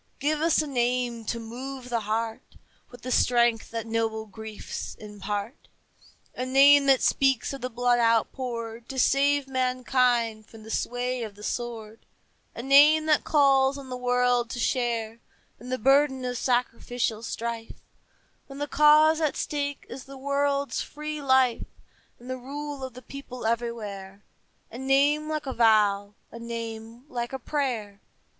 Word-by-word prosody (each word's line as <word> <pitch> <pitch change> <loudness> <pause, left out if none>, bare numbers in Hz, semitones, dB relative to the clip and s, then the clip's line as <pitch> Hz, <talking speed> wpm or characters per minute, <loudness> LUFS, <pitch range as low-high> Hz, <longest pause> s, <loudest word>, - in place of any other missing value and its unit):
Give 300 +2 -1
us 320 -1 +3
a - - -4
name 245 -3 -1
to 235 - -3
move 250 +3 -8
the 235 -1 0
heart 220 +1 -4 0.3
With 245 - -14
the 255 - -4
strength 240 -2 +2
that 230 -1 -4
noble 225 -1 -2
griefs 220 0 -7
impart, 205 +3 -6 0.7
A 255 - -4
name 275 +2 +6
that 270 -2 +4
speaks 270 -2 +2
of 275 - -7
the 255 - -3
blood 245 0 +1
outpoured 230 0 -1
To 270 - -6
save 280 +2 +3
mankind 250 -3 0
from 225 -1 -14
the 220 - -9
sway 245 +2 -2
of 215 -3 -6
the 210 - -13
sword, 225 -2 -5 0.6
A 230 - -6
name 295 +3 +6
that 305 -1 +3
calls 275 -2 +3
on 275 -2 -10
the 250 - -4
world 245 -1 +1
to 245 - -5
share 230 -2 -1 0.4
In 245 +3 -10
the 255 - -1
burden 270 +1 +3
of 250 0 -3
sacrificial 245 -2 -1
strife 230 0 -5 0.7
When 275 - -10
the 290 - -2
cause 305 +2 +5
at 305 -3 0
stake 285 -1 -3
is 270 - -9
the 275 0 -11
world's 280 +1 -1
free 300 0 -6
life 260 -3 +2 0.5
And 245 - -15
the 255 0 -4
rule 285 +2 -6
of 260 -2 -7
the 255 - -11
people 255 -4 -9
everywhere, 210 -4 -4 0.5
A 235 - -8
name 285 +3 +2
like 305 -2 -3
a 265 - -3
vow, 210 -3 +3 0.2
a 230 - -9
name 230 +1 -7
like 240 -3 -4
a - - -2
prayer. 235 -7 -3
250 Hz, 155 wpm, -26 LUFS, 230-275 Hz, 0.7 s, name